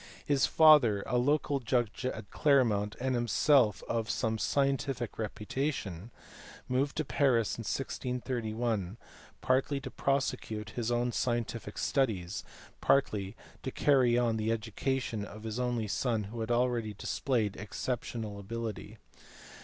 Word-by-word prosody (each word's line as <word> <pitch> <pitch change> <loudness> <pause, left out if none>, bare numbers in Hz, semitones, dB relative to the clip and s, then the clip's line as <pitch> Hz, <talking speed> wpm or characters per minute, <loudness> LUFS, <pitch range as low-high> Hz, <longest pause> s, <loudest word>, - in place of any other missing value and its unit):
His 140 -2 +3
father, 140 -11 +6
a 125 - +1
local 145 +2 +1
judge 120 0 -1
at 110 -5 -6
Cler 140 -3 +4
mont 105 -2 -1
and 130 +1 0
himself 120 -1 +3
of 115 -2 -1
some 110 0 0
scientific 135 -4 0
reputation, 110 - -3 0.6
moved 135 +3 0
to 155 - 0
Paris 125 -6 +2
in - - -6
1631, 115 -5 -2 0.4
partly 135 +2 +1
to - - -7
prosecute 110 -5 -1
his 120 -2 -2
own 120 0 +1
scientific 115 -3 -2
studies, 105 -9 0 0.4
partly 105 -7 +2 0.3
to - - -3
carry 130 -3 +3
on 120 -2 +2
the 110 +1 0
education 115 +1 -2
of 105 +1 -9
his 110 +1 -4
only 120 -3 -1
son 115 0 0
who 120 - -5
had 110 0 -3
already 120 -3 +1
displayed 110 -2 -1
exceptional 110 -1 -4
ability. 110 0 -5
120 Hz, 130 wpm, -31 LUFS, 110-130 Hz, 0.6 s, father